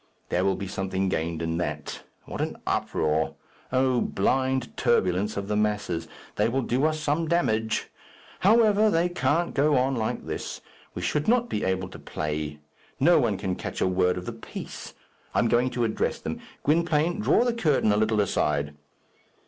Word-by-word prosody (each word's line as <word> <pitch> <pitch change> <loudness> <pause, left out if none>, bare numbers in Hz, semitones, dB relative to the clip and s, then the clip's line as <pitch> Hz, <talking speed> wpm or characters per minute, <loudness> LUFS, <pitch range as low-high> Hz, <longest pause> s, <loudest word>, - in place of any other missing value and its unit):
There 90 - +1
will 95 0 +2
be 100 - -5
something 95 0 -1
gained 85 -2 -2
in 80 +1 -1
that. 75 -3 -4 0.2
What - - -5
an - - -2
uproar! 80 0 0 0.4
O 130 -1 +2
blind 130 +5 0
turbulence 95 +4 +1
of 100 0 -3
the 105 - -1
masses. 105 -5 -1 0.3
They 105 +2 +3
will 130 +2 0
do 125 +5 +1
us 155 0 +1
some 150 +2 0
damage. 110 -10 +1 0.5
However, 215 +1 +5
they 170 -1 +2
can't 165 +1 0
go 145 +1 +3
on 130 +1 +2
like 110 -2 -2
this. - - -5 0.4
We - - -4
should 150 - 0
not 240 +1 +3
be 105 - -2
able 95 -1 0
to - - -11
play. 75 -1 -4 0.4
No 170 +5 +5
one 115 -7 +1
can 95 -1 -2
catch - - -5
a - - +2
word 90 -1 +2
of 90 - -5
the - - -4
piece. - - -8 0.4
I - - +2
am - - +4
going 120 +2 +3
to 120 -1 -1
address 110 -1 0
them. - - -5 0.2
Gwynplaine, 165 +3 +2
draw 215 - +4
the 245 -1 +1
curtain 150 - +2
a 105 - +2
little 110 0 +2
aside. 75 -6 0
110 Hz, 180 wpm, -26 LUFS, 95-150 Hz, 0.5 s, However